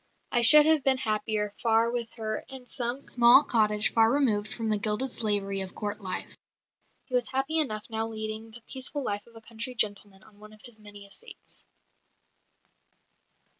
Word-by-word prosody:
I 240 - +3
should 300 +5 +10
have 315 -3 +3
been 270 -2 +2
happier 215 -3 -2
far 230 0 +2
with 235 -2 -4
her 215 -1 -4
in 265 -2 -11
some 245 +2 -4
small 240 +3 +6
cottage 210 -4 +1
far 225 0 +4
removed 220 -7 0
from 225 -1 -4
the 210 -1 +2
gilded 215 +6 -1
slavery 200 -3 0
of 190 0 -6
Court 210 0 -4
life." 185 -2 -5 0.7
He 255 - -16
was 250 -1 +1
happy 275 +5 -1
enough 215 -8 -3
now 225 -1 -3
leading 220 0 -6
the 225 +1 -10
peaceful 270 +2 -4
life 205 -2 -4
of 230 - -20
a 225 - -12
country 230 +2 -6
gentleman 205 -2 -3
on 205 -2 -21
one 215 0 -14
of 215 - -18
his 240 -4 -7
many 205 -1 -13
estates. 200 - -10
225 Hz, 175 wpm, -27 LUFS, 210-245 Hz, 0.7 s, should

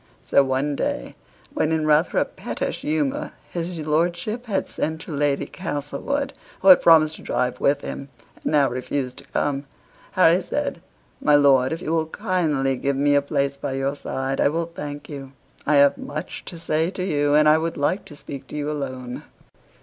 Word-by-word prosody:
So 140 - +4
one 135 +2 0
day, - - -3 0.4
when 155 - +1
in 160 -1 +1
rather 155 +2 +3
a - - +4
pettish - - -4
humor 150 -3 -1 0.2
his 175 0 -3
lordship 175 +10 -1
had 200 -3 -1
sent 160 +1 -3
to 175 - -8
Lady 145 -1 +1
Castlewood, 180 - -3 0.3
who 195 - +5
had 185 - +9
promised 160 -2 +5
to - - -13
drive 125 0 -1
with 140 0 +2
him, 140 - -6 0.3
and - - -8
now 145 -3 +4
refused 130 +1 -3
to - - -11
come, 140 -1 -2 0.5
Harry 180 -1 +5
said 280 -1 -3 0.4
"My 150 - +5
lord, 135 -3 +5
if 165 +2 -4
you - - -2
will 160 -1 +1
kindly 150 -7 0
give 140 +2 0
me 145 +1 +3
a 145 - +5
place 140 -1 -1
by 140 -1 -3
your 135 +1 -1
side 135 -1 -2
I - - +4
will 165 +2 -2
thank 145 -1 -6
you; 135 -2 -8 0.3
I 150 - +4
have 140 0 +5
much 150 +2 -6
to 175 - -7
say 160 0 0
to 185 -1 -4
you, 145 -5 +2
and 150 0 +5
would 165 0 -2
like 145 +8 0
to 150 - -11
speak 140 -2 -8
to - - -9
you 150 0 -2
alone." 130 -4 -5
145 Hz, 190 wpm, -23 LUFS, 140-165 Hz, 0.5 s, had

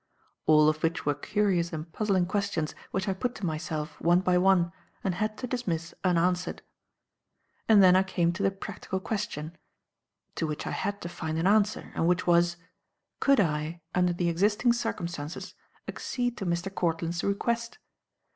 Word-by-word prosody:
All 155 -1 +6
of 155 0 +1
which 165 0 -1
were 145 - +3
curious 190 -1 0
and 160 0 -6
puzzling 195 -4 +1
questions 190 -4 -1 0.2
which 190 +1 -2
I 195 - +1
put 245 +6 -3
to 210 - -4
myself, 155 -1 -4
one 175 +2 +4
by 185 -1 +2
one, 180 -2 +4 0.3
and 190 - 0
had 215 +4 -2
to - - -4
dismiss 175 -10 -3
unanswered. 180 0 +1 1.1
And 210 -3 +8
then 180 -1 +7
I 185 - +6
came 175 -3 +1
to 180 - -5
the 195 - +4
practical 195 0 -5
question, 170 -6 -4 0.8
to 160 - 0
which 150 -1 -4
I - - -3
had 200 0 -3
to - - -4
find 160 -2 -4
an 165 - 0
answer, 210 +1 +2
and 165 - +1
which 180 +1 +2
was: 175 0 +3 0.6
Could 275 -2 +4
I, 160 -1 0
under 180 0 +3
the 175 0 -1
existing 205 +8 +3
circumstances, 175 -9 -4 0.3
accede 245 -2 -2
to 195 -3 -4
Mr. 175 +3 -1
Courtland's 170 -1 -1
request? 235 - -1
180 Hz, 165 wpm, -28 LUFS, 165-200 Hz, 1.1 s, And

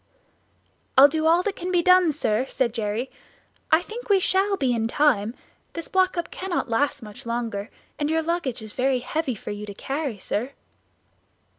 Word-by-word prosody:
"I'll 275 +2 +10
do 315 +2 0
all 340 +2 +4
that 405 0 -2
can 360 +1 -4
be 350 -2 +2
done, 365 -2 +6
sir," 255 -4 0
said 245 -4 0
Jerry; 225 +2 -2 0.6
"I 320 +2 +5
think 470 +4 -8
we 400 -1 +5
shall 390 +2 +2
be 260 -6 +1
in 225 -1 0
time. 235 -4 +2 0.4
This 335 - -6
block 370 -1 +2
up 345 - -3
cannot 360 -9 -3
last 275 +2 0
much 210 -1 -10
longer, 230 -3 -3 0.3
and 295 0 0
your 320 0 +1
luggage 310 -9 -2
is 215 -1 -7
very 260 0 +1
heavy 275 0 -2
for 210 - -7
you 205 0 -6
to 205 - -8
carry, 275 -1 -3
sir." 240 +7 -3
280 Hz, 180 wpm, -24 LUFS, 230-345 Hz, 0.6 s, I'll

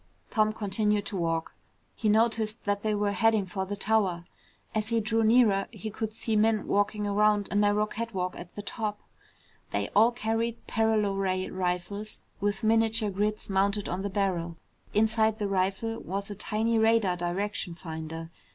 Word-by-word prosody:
Tom 215 -2 +3
continued 210 0 0
to 200 - -4
walk. 165 -2 -1 0.4
He 215 - 0
noticed 220 0 +1
that 205 0 0
they 215 0 0
were 205 0 +1
heading 220 -1 +3
for 190 +1 -4
the 205 - -3
tower. 195 -4 +1 0.5
As 215 -1 -1
he 230 -1 +2
drew 225 +1 +1
nearer, 220 -3 +4
he 220 - -7
could 220 +1 -3
see 220 0 -2
men 215 0 +3
walking 205 +1 +1
around 205 0 +2
a - - -2
narrow 205 +1 +3
catwalk 210 -5 -3
at 175 0 -10
the 205 - -6
top. 210 -1 -3 0.7
They 100 0 -1
all 225 +4 +5
carried 230 0 -2
paralo 220 -3 +1
ray 185 -1 0
rifles 185 +3 -3 0.2
with 205 +3 -1
miniature 225 -1 +3
grids 210 +2 -1
mounted 200 +1 +1
on 180 +2 -2
the 200 - -2
barrel. 180 -4 -1 0.3
Inside 220 0 +2
the 210 -2 -1
rifle 195 +4 -1
was 200 +3 -4
a - - -5
tiny 220 +2 0
radar 220 -4 +3
direction 180 +1 -2
finder. 165 -1 -7
210 Hz, 165 wpm, -28 LUFS, 195-220 Hz, 0.7 s, all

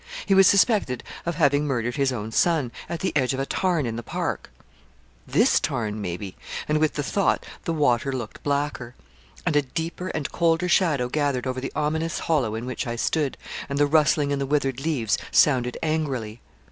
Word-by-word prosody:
He 195 - +2
was 195 -1 +7
suspected 200 - +3 0.2
of 170 - -1
having 145 -2 +3
murdered 125 -3 -1
his 140 -2 +1
own 110 -3 -4
son, 150 -2 +2 0.2
at 170 - -4
the 185 - -1
edge 130 -2 +2
of - - -4
a 135 - 0
tarn 175 -2 0
in 115 -1 -3
the - - -3
park. - - -3 0.8
This - - +4
tarn 110 -2 -2
maybe 95 +1 -5 0.3
and 150 0 +2
with 155 -1 +1
the 145 - -1
thought 195 +7 +1 0.2
the - - 0
water 135 -4 +2
looked 120 -5 -6
blacker 140 -4 -2 0.5
and 165 -4 +1
a 145 - +5
deeper 165 +6 -4
and 155 -6 -3
colder 170 +1 +2
shadow 160 -9 +2
gathered 140 -2 0
over 130 0 -2
the 135 - -4
ominous 160 +2 -1
hollow 135 -10 0
in 115 +2 -4
which 130 0 -4
I 120 - -2
stood, 145 +4 0 0.3
and 140 - -2
the 145 - +4
rustling 150 -1 +3
in 140 - 0
the 140 - -2
withered 135 -3 0
leaves 135 -9 0
sounded 125 -4 +3
angrily. 135 -8 -2
140 Hz, 190 wpm, -24 LUFS, 125-160 Hz, 0.8 s, was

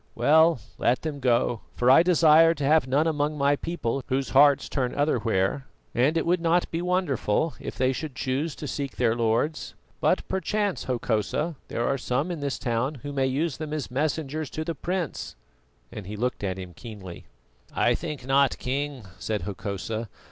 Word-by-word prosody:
Well, 160 +4 +5 0.2
let 125 - +1
them 155 -3 -4
go, 120 -3 +1
for 125 +1 +4
I 135 - +8
desire 165 -2 +5
to 145 - -4
have 150 -1 +4
none 140 +4 +2
among 150 -1 0
my 140 0 +3
people 140 -5 -3
whose 135 +1 -1
hearts 140 0 +5
turn 125 -3 -2
otherwhere, 120 -3 0 0.3
and 140 +7 +2
it 165 - 0
would 175 +1 +2
not 170 +1 +2
be 165 - -2
wonderful 165 - 0
if - - -6
they 130 0 +2
should 145 0 -5
choose 135 +5 -2
to 150 - -6
seek 140 +1 -4
their 120 -3 +2
lords. 120 +7 0 0.2
But - - +1
perchance, 200 +1 -1
Hokosa, 125 +6 -1
there 120 - -2
are 135 - 0
some 140 +9 -1
in 170 - -4
this 140 -1 -2
town 125 +4 -1
who 145 0 -5
may 135 -1 +1
use 140 +3 -1
them 155 -1 -5
as 150 -5 -4
messengers 150 +1 -2
to 155 - -4
the 165 - -2
prince" 175 +1 -4 0.6
and 100 -3 -8
he 105 - -5
looked 125 0 -2
at 95 -1 -2
him 90 -2 -8
keenly. 95 -3 -10 0.5
"I 120 - +2
think 150 -1 -5
not, 135 0 +3
King," 135 -2 -3
said 110 -2 -2
Hokosa. 105 +2 -4
140 Hz, 180 wpm, -26 LUFS, 120-155 Hz, 0.6 s, I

